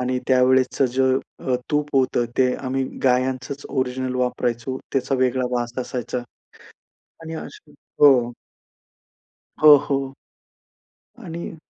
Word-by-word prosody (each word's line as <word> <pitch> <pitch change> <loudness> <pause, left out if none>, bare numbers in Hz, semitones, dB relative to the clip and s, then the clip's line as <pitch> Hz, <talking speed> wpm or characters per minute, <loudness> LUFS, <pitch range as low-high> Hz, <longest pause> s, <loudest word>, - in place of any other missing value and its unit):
आणि 125 0 -1
त्या 130 -1 +4
वेळेसचं 130 0 +2
जे 130 - +2 0.4
अ, 130 -1 +1
तूप 150 -1 0
होतं 130 -2 +2
ते 125 -1 +3
आम्ही 135 0 -2 0.2
गायांचंच 130 +2 0
ओरिजिनल 130 -1 -2
वापरायचो, 125 0 -2
त्याचा 135 0 0
वेगळा 130 0 +1
वास 120 0 -4
असायचा. 125 -1 -3 1.1
आणि 160 0 -7
असा 155 -1 -10 0.3
हो. 130 -5 +6 1.3
हो, 150 -1 +10
हो. 135 -1 -2 1.1
आणि 170 0 -7
130 Hz, 115 wpm, -22 LUFS, 125-135 Hz, 1.3 s, हो